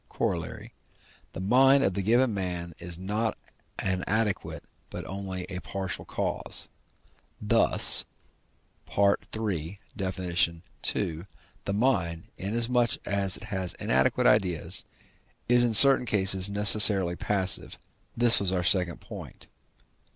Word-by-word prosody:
Coroll.) - - -5 0.6
the - - -9
mind 135 +7 +2
of 95 - -1
the 100 - -3
given 120 +4 0
man 90 -3 -6
is 85 -1 -7
not 105 +4 -4 0.4
an 95 -1 -3
adequate, 105 -1 -3 0.3
but - - -9
only 95 -1 -7
a 90 -2 -7
partial 95 -1 -7
cause; - - -4 0.7
thus - - +4 0.9
(III. 100 -3 -2 0.2
Def. 95 -1 -6
ii.) 85 -2 -4 0.4
the 100 - -4
mind, 100 -8 -2
inasmuch 120 +3 -2
as 100 -2 0
it - - -14
has 95 -5 -4
inadequate 65 +1 -1
ideas, 95 -6 0 0.6
is 120 0 +3
in 115 -2 +1
certain 135 +2 +9
cases 95 -2 +2
necessarily 100 -3 +5
passive; 95 -1 -1 0.4
this 120 0 +9
was 95 -2 -2
our 90 -1 -2
second 90 -2 0
point. - - -12
95 Hz, 115 wpm, -25 LUFS, 90-110 Hz, 0.9 s, certain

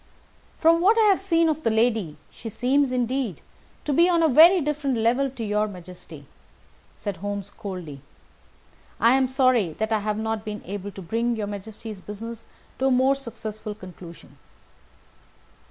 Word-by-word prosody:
"From 335 +1 +4
what 420 +6 +4
I 450 - +5
have 385 - +1
seen 335 -4 +2
of 310 -1 0
the 230 - +1
lady 220 -8 +1
she 225 - -8
seems 260 +5 +1
indeed 250 - -1 0.5
to 295 - 0
be 340 +5 +5
on 340 -2 +3
a - - +5
very 330 +7 +7
different 290 -4 -1
level 245 +5 +2
to 250 -3 -7
your 210 0 0
Majesty," 180 -6 -11 0.7
said 205 -4 -5
Holmes, 205 +2 -5
coldly. 180 -10 -7 1.0
"I 230 +2 +5
am 265 -1 +2
sorry 255 - +2
that 220 +6 -3
I 220 - +2
have 210 0 -2
not 220 0 -2
been 210 -1 -6
able 200 +1 -5
to 195 -1 -10
bring 230 +6 -1
your 215 -2 -3
Majesty's 205 0 -8
business 225 +3 -8 0.3
to 265 - +2
a - - +4
more 260 +1 +4
successful 220 -5 -7
conclusion." 180 -4 -13
225 Hz, 165 wpm, -24 LUFS, 205-270 Hz, 1.0 s, very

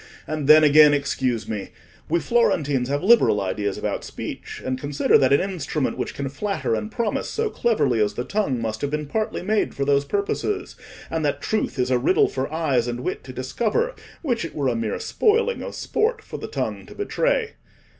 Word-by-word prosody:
And 155 -3 -3
then, 155 +1 +8
again, 150 0 +7
excuse 130 -4 -1
me—we 110 - -5
Florentines 145 - +1
have 145 +3 -1
liberal 220 - +5
ideas 100 +1 -2
about - - -3
speech, - - -7
and 130 0 -2
consider 145 -1 +1
that 130 -1 +3
an 140 - +5
instrument 150 -5 -2
which - - -4
can 140 - -3
flatter 170 - -2
and 105 -1 -2
promise 230 -3 -2
so 445 -1 -1
cleverly 140 - +1
as 105 -1 +1
the 120 - -2
tongue, 170 - -1
must 110 -1 -3
have 145 - -1
been 150 +1 -2
partly 215 +7 -2
made 215 +3 0
for 140 - -1
those 140 0 +3
purposes; 200 - -2 0.4
and 160 -1 -1
that 145 - 0
truth 215 -9 -2
is 125 0 0
a 125 - +3
riddle 160 +9 +3
for 135 +2 -3
eyes 140 -7 +1
and 120 0 -3
wit - - -3
to 130 - -8
discover, 220 - -1 0.3
which 245 - 0
it 165 -3 -6
were 140 -3 +1
a 120 - -1
mere 115 -2 -2
spoiling 460 +2 +1
of - - -6
sport 445 +1 -1
for - - -7
the - - -6
tongue - - -4
to - - -12
betray. 455 +2 0
145 Hz, 195 wpm, -23 LUFS, 130-210 Hz, 0.4 s, then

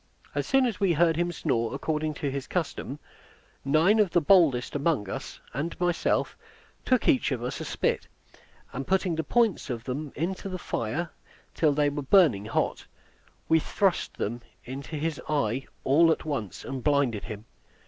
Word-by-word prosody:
As - - -2
soon 270 -1 +4
as 235 -5 -2
we 195 -4 +3
heard 165 +1 +3
him 175 +2 0
snore 115 -9 -1
according 155 -1 -2
to 140 -1 -2
his 140 -1 -4
custom, 155 -5 -3 0.7
nine 160 +10 +4
of 205 -3 +4
the 175 - +3
boldest 155 -8 +4
among 145 - +1
us, - - -6
and 155 +5 -3
myself, 175 -1 +1 0.5
took 255 -2 +2
each 265 - +3
of 120 -3 -2
us 125 - -3
a - - -4
spit, - - -1 0.7
and 135 +1 -5
putting 190 -2 +1
the 160 0 -1
points 225 -3 +1
of 120 -2 -4
them 140 +3 -4
into 185 +5 -3
his 185 -1 -5
fire 150 +10 -2 0.4
till 155 -2 +3
they 145 0 +2
were 145 0 -3
burning 140 - +4
hot, 115 - -1 0.6
we 160 - +5
thrust 190 +3 0
them 120 +4 -3 0.2
into 135 +5 -6
his 155 0 -2
eye 135 -4 0 0.2
all 165 +5 +5
at - - -1
once, 110 - -4
and 135 -2 -5
blinded 140 -8 +1
him. 110 -1 -7
150 Hz, 170 wpm, -27 LUFS, 130-175 Hz, 0.7 s, we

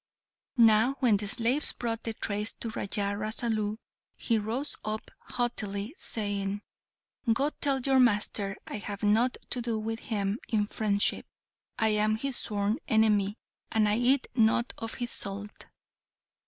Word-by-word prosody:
Now 230 +3 +5
when 235 -6 +4
the 205 +1 -4
slaves 240 +7 +2
brought 230 -2 -3
the 225 -1 -2
trays 210 +1 -2
to 230 - -5
Raja 200 -1 -1
Rasalu, 215 0 -1 0.4
he 230 -2 +1
rose 230 +7 -1
up 215 0 -4
haughtily, 215 -2 -3
saying, 205 - -2 0.7
"Go, 275 +6 +2
tell 275 -3 0
your 265 +1 +3
master 205 -4 +2
I - - -5
have 205 0 -6
nought 225 +5 +3
to 245 - +3
do 230 -2 -1
with 225 +1 -3
him 205 -1 -2
in 210 -2 +2
friendship. 205 -1 0 0.5
I 220 - +3
am 215 0 +2
his 275 +3 -2
sworn 205 0 -1
enemy, 210 -2 +3 0.3
and 220 -1 +3
I 210 +2 +2
eat 255 +2 +3
not 235 0 +3
of 225 0 -5
his 240 -1 -2
salt!" 200 +1 -4
220 Hz, 145 wpm, -29 LUFS, 205-235 Hz, 0.7 s, Now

